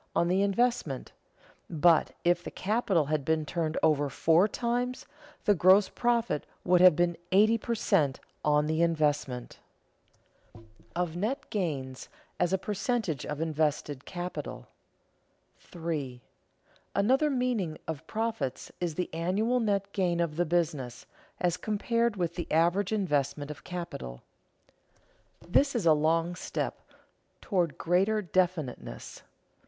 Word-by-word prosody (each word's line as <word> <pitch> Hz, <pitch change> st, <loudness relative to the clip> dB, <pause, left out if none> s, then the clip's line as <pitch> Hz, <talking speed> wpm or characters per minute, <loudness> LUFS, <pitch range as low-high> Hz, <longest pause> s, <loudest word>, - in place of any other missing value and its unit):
on 170 Hz, -, +3 dB
the 185 Hz, +2 st, +2 dB
investment; 200 Hz, -, 0 dB, 0.6 s
but, 165 Hz, 0 st, +3 dB
if 175 Hz, 0 st, +2 dB
the -, -, -5 dB
capital 195 Hz, -6 st, 0 dB
had 150 Hz, 0 st, -1 dB
been 160 Hz, +1 st, 0 dB
turned 160 Hz, 0 st, -2 dB
over 145 Hz, -2 st, +3 dB
four 165 Hz, +7 st, +3 dB
times, 245 Hz, +3 st, -2 dB, 0.4 s
the 205 Hz, -, +5 dB
gross 190 Hz, +2 st, +5 dB
profit 235 Hz, -9 st, 0 dB, 0.2 s
would 180 Hz, 0 st, +4 dB
have 180 Hz, -3 st, +8 dB
been 175 Hz, +1 st, +1 dB, 0.2 s
eighty 215 Hz, +4 st, +5 dB
per 235 Hz, +1 st, -2 dB
cent. 145 Hz, -10 st, +1 dB, 0.2 s
on 150 Hz, 0 st, +3 dB
the 160 Hz, +1 st, 0 dB
investment. 150 Hz, -6 st, 0 dB, 1.0 s
[Sidenote: 115 Hz, -, -15 dB, 0.3 s
Of 175 Hz, -2 st, -1 dB
net 220 Hz, +9 st, -2 dB
gains 140 Hz, -10 st, -3 dB, 0.3 s
as 180 Hz, 0 st, +2 dB
a 190 Hz, -, +3 dB
percentage 195 Hz, -, -2 dB
of 150 Hz, +1 st, -4 dB
invested 150 Hz, -3 st, -1 dB
capital] 180 Hz, 0 st, -6 dB, 0.9 s
3. 155 Hz, -7 st, -5 dB, 0.8 s
Another 265 Hz, +9 st, +3 dB
meaning 245 Hz, -, -1 dB
of 160 Hz, -3 st, -5 dB
profits 220 Hz, -, -3 dB
is 170 Hz, -3 st, -1 dB
the 180 Hz, -, -1 dB
annual 200 Hz, +9 st, +1 dB
net 200 Hz, -3 st, -1 dB
gain 175 Hz, -3 st, +1 dB
of 170 Hz, -3 st, 0 dB
the 175 Hz, +2 st, +1 dB
business, 155 Hz, -7 st, -1 dB, 0.3 s
as 180 Hz, -1 st, +1 dB
compared 230 Hz, +3 st, 0 dB
with 175 Hz, -3 st, -1 dB
the 175 Hz, 0 st, -6 dB
average 175 Hz, +5 st, +2 dB
investment 145 Hz, -7 st, 0 dB
of 150 Hz, -, -10 dB
capital. 65 Hz, -, -6 dB, 1.2 s
This 275 Hz, +10 st, +3 dB
is 220 Hz, -7 st, 0 dB
a 160 Hz, -, +7 dB
long 165 Hz, +3 st, +1 dB
step 175 Hz, -, -4 dB, 0.6 s
toward 175 Hz, -6 st, -1 dB
greater 195 Hz, +5 st, +2 dB
definiteness. 165 Hz, -, -2 dB
175 Hz, 130 wpm, -29 LUFS, 155-200 Hz, 1.2 s, have